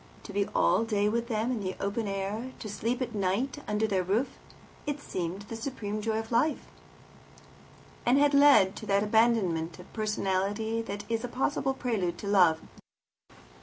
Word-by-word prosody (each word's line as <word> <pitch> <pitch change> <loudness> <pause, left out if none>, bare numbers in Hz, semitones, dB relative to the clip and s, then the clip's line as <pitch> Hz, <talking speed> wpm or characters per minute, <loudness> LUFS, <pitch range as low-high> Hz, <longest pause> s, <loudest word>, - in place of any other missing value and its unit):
To 205 - -9
be 200 +1 +1
all - - +4
day 210 -2 +1
with 235 +2 -1
them 225 +1 0
in 245 - -1
the 190 -2 -3
open 205 +2 -2
air, 200 +6 -3
to - - -7
sleep 235 +5 -1
at 240 -1 -6
night 210 +8 -1
under 210 +1 +1
their 195 -3 +1
roof, 205 +9 0 0.6
had 290 0 -2
seemed 185 -5 -4
the 215 +3 -7
supreme 220 -3 -4
joy 220 0 -1
of 225 +1 -5
life, 265 +7 +1 1.4
and 245 +3 +4
had 290 0 +4
led 280 -9 +6
to 215 - -8
that 200 0 +3
abandonment 210 -7 +2
of 180 - -14
personality 215 +1 -1
that 205 -2 -5
is 230 0 -1
a - - -2
possible 270 +2 -1
prelude 200 -10 -1
to 200 - -7
love. 180 -5 +5
215 Hz, 170 wpm, -29 LUFS, 195-235 Hz, 1.4 s, led